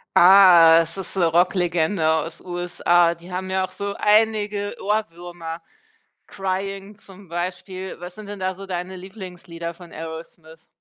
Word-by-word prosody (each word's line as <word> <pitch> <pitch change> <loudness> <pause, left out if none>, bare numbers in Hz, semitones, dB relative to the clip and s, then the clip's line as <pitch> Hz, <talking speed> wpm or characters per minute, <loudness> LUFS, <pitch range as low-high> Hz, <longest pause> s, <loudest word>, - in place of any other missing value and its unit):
Ah, 175 -3 +8
es 165 +3 -5
ist 190 0 -6
'ne 175 - +3
Rock-Legende 175 0 +1
aus 160 +1 -2
USA, 175 -1 +1
die 170 +2 -14
haben 185 +1 -4
ja 190 0 +1
auch - - -14
so 200 0 -4
einige 210 -1 +1
Ohrwürmer, 175 -5 -4 0.7
„Crying“ 195 +1 -4
zum 195 -2 -16
Beispiel. 185 +2 -5
Was 180 0 -9
sind 215 -1 -10
denn 205 - -7
da 185 0 -2
so 195 +1 -9
deine 185 0 -5
Lieblingslieder 180 -3 -8
von 175 -1 -14
Aerosmith? 160 0 -10
180 Hz, 145 wpm, -22 LUFS, 170-195 Hz, 0.7 s, Ah